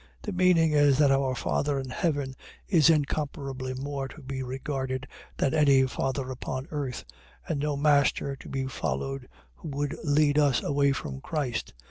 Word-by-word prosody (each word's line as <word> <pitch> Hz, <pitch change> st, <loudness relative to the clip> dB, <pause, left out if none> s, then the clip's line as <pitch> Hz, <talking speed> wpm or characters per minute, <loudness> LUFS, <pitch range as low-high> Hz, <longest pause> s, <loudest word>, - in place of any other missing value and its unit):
.The 210 Hz, -, -3 dB
meaning 180 Hz, -3 st, +4 dB
is 145 Hz, -2 st, +4 dB
that 145 Hz, -2 st, +5 dB
our 135 Hz, -1 st, +2 dB
Father 140 Hz, +2 st, 0 dB
in 130 Hz, -1 st, -5 dB
heaven 145 Hz, -3 st, -1 dB, 0.3 s
is 165 Hz, -5 st, +5 dB
incomparably 140 Hz, -4 st, -1 dB
more 135 Hz, +1 st, -3 dB
to 150 Hz, +2 st, -13 dB
be 130 Hz, 0 st, -4 dB
regarded, 130 Hz, 0 st, -3 dB, 0.3 s
than 135 Hz, -, +1 dB
any 140 Hz, -3 st, +5 dB
father 130 Hz, +1 st, -2 dB
upon 130 Hz, +1 st, -4 dB
earth: 140 Hz, -5 st, -4 dB, 0.4 s
and 155 Hz, -4 st, -1 dB
no 145 Hz, 0 st, -1 dB
master 140 Hz, -1 st, +2 dB
to -, -, -11 dB
be 135 Hz, -1 st, -2 dB
followed, 135 Hz, 0 st, -3 dB, 0.2 s
who -, -, -10 dB
would 145 Hz, 0 st, -2 dB
lead 150 Hz, 0 st, +3 dB
us 140 Hz, -4 st, +3 dB
away 140 Hz, 0 st, +2 dB
from 65 Hz, -, -4 dB
Christ. 135 Hz, -, -3 dB
140 Hz, 160 wpm, -28 LUFS, 130-150 Hz, 0.4 s, that